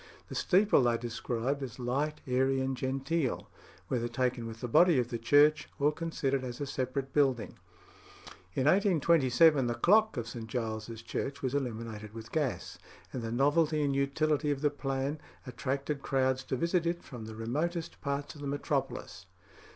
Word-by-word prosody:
The -, -, -7 dB
steeple 200 Hz, -2 st, +4 dB
they 120 Hz, -2 st, +2 dB
described 120 Hz, +3 st, -2 dB
as 130 Hz, -5 st, -6 dB
"light, 140 Hz, +5 st, -2 dB
airy, 130 Hz, +1 st, +2 dB
and 130 Hz, 0 st, -1 dB
genteel." 135 Hz, +3 st, -2 dB, 0.4 s
whether 120 Hz, -2 st, -1 dB
taken 120 Hz, -1 st, -1 dB
with 115 Hz, 0 st, -8 dB
the 125 Hz, -, -2 dB
body 170 Hz, +6 st, +5 dB
of 120 Hz, -1 st, +1 dB
the 120 Hz, -2 st, -3 dB
church 145 Hz, +6 st, +4 dB
or 145 Hz, 0 st, +3 dB
considered 145 Hz, -4 st, -2 dB
as 120 Hz, -1 st, -6 dB
a 145 Hz, -, -2 dB
separate 135 Hz, 0 st, -3 dB
building. 135 Hz, -6 st, +1 dB, 1.0 s
In 130 Hz, -, +1 dB
1827 160 Hz, -, +4 dB
the 120 Hz, -, -1 dB
clock 210 Hz, -, +4 dB
of 115 Hz, -1 st, -3 dB
St. 115 Hz, -1 st, -7 dB
Giles's 110 Hz, -1 st, -4 dB
Church 140 Hz, +4 st, -4 dB
was 130 Hz, -1 st, -1 dB
illuminated 115 Hz, -5 st, -4 dB
with 110 Hz, -1 st, -9 dB
gas, 150 Hz, -5 st, -2 dB, 0.3 s
and 130 Hz, -, -3 dB
the 115 Hz, 0 st, -4 dB
novelty 150 Hz, +4 st, +2 dB
and 140 Hz, -1 st, +1 dB
utility 150 Hz, +2 st, +1 dB
of 140 Hz, -2 st, -1 dB
the 150 Hz, -1 st, +2 dB
plan 135 Hz, +1 st, -2 dB, 0.3 s
"attracted 135 Hz, +2 st, -3 dB
crowds 130 Hz, -1 st, +1 dB
to -, -, -1 dB
visit 170 Hz, +5 st, +1 dB
it 170 Hz, 0 st, -2 dB
from 120 Hz, -5 st, -9 dB
the 110 Hz, 0 st, -8 dB
remotest 160 Hz, +10 st, -3 dB
parts 140 Hz, 0 st, -3 dB
of 145 Hz, -, -12 dB
the 145 Hz, -, -4 dB
metropolis." 140 Hz, -1 st, -3 dB
135 Hz, 165 wpm, -31 LUFS, 120-150 Hz, 1.0 s, body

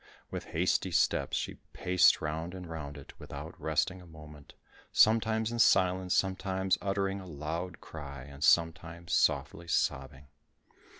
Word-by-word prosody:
With -, -, -5 dB
hasty -, -, 0 dB
steps, -, -, +1 dB
she -, -, -4 dB
paced 90 Hz, 0 st, +4 dB
round 80 Hz, +3 st, -3 dB
and 90 Hz, -1 st, -8 dB
round 75 Hz, -3 st, -7 dB
it, 70 Hz, -, -12 dB
without -, -, -8 dB
resting 90 Hz, +4 st, 0 dB
a 90 Hz, -, -14 dB
moment, 75 Hz, -2 st, -13 dB, 0.4 s
sometimes 110 Hz, 0 st, +3 dB
in 120 Hz, -, -3 dB
silence, 95 Hz, -4 st, +3 dB
sometimes 95 Hz, 0 st, 0 dB
uttering 100 Hz, 0 st, -1 dB
a 95 Hz, -, -11 dB
loud 80 Hz, +3 st, -5 dB
cry, 70 Hz, -2 st, -9 dB
sometimes 85 Hz, +2 st, +1 dB
softly 85 Hz, +1 st, +1 dB
sobbing. 70 Hz, -4 st, -1 dB
85 Hz, 130 wpm, -31 LUFS, 75-95 Hz, 0.4 s, paced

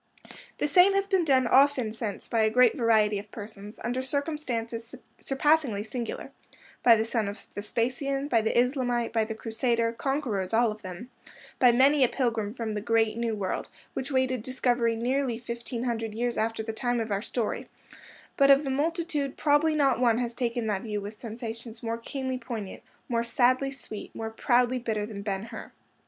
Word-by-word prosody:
The -, -, 0 dB
same 365 Hz, +6 st, +6 dB
has 395 Hz, 0 st, +2 dB
been 385 Hz, -3 st, +2 dB
done 265 Hz, -5 st, +3 dB
often 265 Hz, -2 st, +4 dB
since 220 Hz, -2 st, -4 dB
by 230 Hz, -, +1 dB
a 220 Hz, -, +4 dB
great 245 Hz, +1 st, +5 dB
variety 215 Hz, -3 st, +3 dB
of 205 Hz, +1 st, -11 dB
persons, 210 Hz, -1 st, -9 dB
under 245 Hz, +2 st, -1 dB
circumstances 255 Hz, -5 st, -3 dB, 0.2 s
surpassingly 270 Hz, -6 st, +1 dB
singular—by 235 Hz, 0 st, -1 dB
the 220 Hz, 0 st, 0 dB
son 225 Hz, -2 st, 0 dB
of 200 Hz, 0 st, -7 dB
Vespasian, 255 Hz, +6 st, -2 dB
by 235 Hz, -6 st, +3 dB
the 220 Hz, -, 0 dB
Islamite, 245 Hz, -2 st, 0 dB
by 225 Hz, -1 st, +3 dB
the 220 Hz, 0 st, -5 dB
Crusader, 230 Hz, +1 st, 0 dB
conquerors 230 Hz, -7 st, -1 dB
all 230 Hz, -1 st, +4 dB
of 210 Hz, 0 st, -9 dB
them; 190 Hz, +5 st, -8 dB, 0.5 s
by 250 Hz, -2 st, +7 dB
many 270 Hz, +4 st, +5 dB
a -, -, +6 dB
pilgrim 225 Hz, -5 st, -1 dB
from 225 Hz, -3 st, -3 dB
the 210 Hz, -, -3 dB
great 225 Hz, 0 st, +2 dB
New 230 Hz, -1 st, -1 dB
World, 195 Hz, -3 st, -3 dB, 0.2 s
which 265 Hz, +2 st, -4 dB
waited 260 Hz, -2 st, +1 dB
discovery 240 Hz, -1 st, +1 dB
nearly 250 Hz, +1 st, 0 dB
fifteen 235 Hz, 0 st, -5 dB
hundred 225 Hz, -3 st, -2 dB
years 240 Hz, +1 st, -1 dB
after 225 Hz, 0 st, -1 dB
the 225 Hz, 0 st, -4 dB
time 245 Hz, +1 st, -1 dB
of 225 Hz, -1 st, -3 dB
our 200 Hz, 0 st, 0 dB
story; 230 Hz, -1 st, -3 dB, 0.7 s
but 275 Hz, -1 st, +5 dB
of 275 Hz, +1 st, +7 dB
the 270 Hz, -, -2 dB
multitude 300 Hz, -1 st, -1 dB
probably 305 Hz, +1 st, +3 dB
not 275 Hz, -5 st, +3 dB
one 235 Hz, -3 st, +3 dB
has 240 Hz, -1 st, -2 dB
taken 235 Hz, -1 st, -2 dB
that 205 Hz, -3 st, -1 dB
view 210 Hz, -2 st, -3 dB
with 205 Hz, +1 st, -8 dB
sensations 230 Hz, 0 st, -7 dB
more 230 Hz, 0 st, -2 dB
keenly 260 Hz, +1 st, -4 dB
poignant, 230 Hz, -5 st, -6 dB, 0.3 s
more 235 Hz, -1 st, 0 dB
sadly 255 Hz, +3 st, +2 dB
sweet, 270 Hz, -6 st, -8 dB
more 225 Hz, 0 st, -4 dB
proudly 245 Hz, +2 st, +2 dB
bitter, 220 Hz, -3 st, -2 dB
than 210 Hz, -2 st, -7 dB
Ben 200 Hz, -1 st, -3 dB
Hur. 225 Hz, -, -9 dB
235 Hz, 180 wpm, -28 LUFS, 220-260 Hz, 0.7 s, by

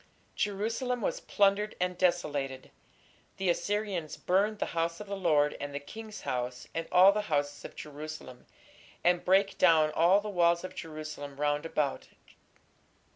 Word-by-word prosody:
Jerusalem 225 Hz, +5 st, -1 dB
was -, -, -1 dB
plundered 205 Hz, +1 st, +2 dB
and 180 Hz, 0 st, 0 dB
desolated. 145 Hz, -7 st, -1 dB, 0.7 s
The 190 Hz, -2 st, +2 dB
Assyrians 195 Hz, -3 st, -2 dB
"burned 200 Hz, +4 st, +1 dB
the -, -, -1 dB
house 165 Hz, 0 st, -1 dB
of 210 Hz, -, -7 dB
the 200 Hz, 0 st, -4 dB
Lord 150 Hz, -6 st, +2 dB
and 145 Hz, 0 st, -5 dB
the -, -, -1 dB
king's 215 Hz, +8 st, -9 dB
house, 125 Hz, 0 st, -3 dB
and 165 Hz, 0 st, -3 dB
all 185 Hz, +2 st, +8 dB
the 210 Hz, +1 st, -1 dB
houses 145 Hz, -1 st, -1 dB
of -, -, -9 dB
Jerusalem", 150 Hz, -4 st, -9 dB, 0.6 s
and 175 Hz, 0 st, +3 dB
"brake 195 Hz, +1 st, +3 dB
down 160 Hz, -4 st, +5 dB
all 170 Hz, +6 st, +4 dB
the 210 Hz, -, -6 dB
walls 170 Hz, -3 st, +2 dB
of 185 Hz, -, -6 dB
Jerusalem 155 Hz, -4 st, -7 dB
round 145 Hz, +1 st, 0 dB
about". 150 Hz, -4 st, -1 dB
170 Hz, 150 wpm, -30 LUFS, 150-200 Hz, 0.7 s, all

